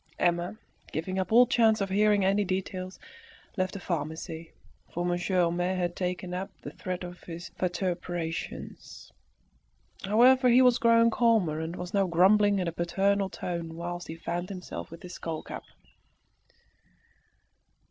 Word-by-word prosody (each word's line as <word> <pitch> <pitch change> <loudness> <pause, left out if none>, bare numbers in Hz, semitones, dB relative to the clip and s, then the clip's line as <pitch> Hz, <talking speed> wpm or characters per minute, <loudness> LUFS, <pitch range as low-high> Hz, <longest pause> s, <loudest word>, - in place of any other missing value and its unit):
Emma, 175 +3 0 0.3
giving 185 +4 -2
up 185 +1 -2
all 245 +2 +8
chance 225 -3 +3
of 195 -1 -2
hearing 205 0 +3
any 200 +2 +3
details, 185 0 -3 0.6
left 185 -1 -1
the 200 - -5
pharmacy; 160 -1 -4 0.4
for 175 +1 -2
Monsieur 175 +1 +1
Homais 175 +2 0
had 175 -1 -1
taken 180 0 -3
up 185 +2 -3
the - - -6
thread 185 -1 -5
of 180 0 -8
his 170 0 -7
vituperations. 175 -2 -4 0.9
However, 250 +6 +5
he 250 +2 +6
was 250 -1 +5
growing 230 0 +5
calmer, 220 -11 +2
and 160 +2 -4
was 180 0 -6
now 195 -2 +3
grumbling 200 +4 +4
in 180 -2 -1
a - - 0
paternal 195 +4 +1
tone 170 -3 -5
whilst 175 +1 -5
he 160 - -6
fanned 175 +2 -4
himself 185 -2 -7
with 165 +1 -11
his 180 0 -8
skull 165 -3 -5
cap. - - -8
180 Hz, 145 wpm, -28 LUFS, 175-200 Hz, 0.9 s, all